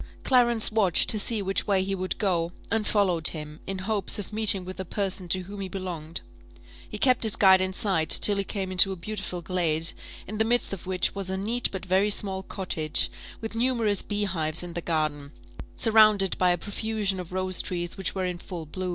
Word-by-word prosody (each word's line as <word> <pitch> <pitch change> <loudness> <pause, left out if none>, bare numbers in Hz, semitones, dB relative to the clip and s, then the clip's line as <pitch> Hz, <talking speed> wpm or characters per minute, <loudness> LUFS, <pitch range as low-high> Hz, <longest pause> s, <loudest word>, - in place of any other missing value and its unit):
Clarence 240 -4 +3
watched 205 -6 +2
to 215 - +2
see 210 0 +1
which 195 0 -1
way 195 -2 +2
he 195 +1 -3
would 185 -1 -2
go, 175 -4 -1 0.2
and 220 -1 0
followed 180 -6 +4
him, 150 -1 -1
in 195 - -3
hopes 200 +1 0
of 205 +1 -8
meeting 210 -4 +4
with 185 +1 -8
the 190 - -4
person 190 0 -1
to 185 +2 -1
whom 200 +2 -9
he 190 - -4
belonged: 175 -4 -6 0.7
he - - -6
kept 255 +3 +3
his 220 -1 +3
guide 190 -2 +5
in 185 0 -1
sight, 185 -5 0
till 205 -1 +5
he 200 - 0
came 195 -1 -4
into 185 +1 +6
a - - -4
beautiful 185 -1 -6
glade, 165 -2 -1 0.3
in 215 +2 -7
the - - +4
midst 240 -1 0
of 185 -2 -8
which 185 -1 0
was 195 -2 -1
a 190 - -2
neat 230 +5 -1
but 190 -1 -6
very 190 +3 +2
small 195 -2 0
cottage, 155 - -1 0.3
with 225 0 -6
numerous 230 -4 0
beehives 175 -6 -2
in 175 -1 -8
the 170 - -3
garden, 155 -4 -2 0.4
surrounded 215 -3 +4
by 180 - +3
a 175 - +2
profusion 205 0 -3
of 180 -1 -8
rose 185 0 +1
trees 175 -1 -4
which 190 0 -4
were 190 -1 -2
in 180 -1 -4
full 175 -3 -8
blow. 185 +4 -5
190 Hz, 210 wpm, -26 LUFS, 175-210 Hz, 0.7 s, into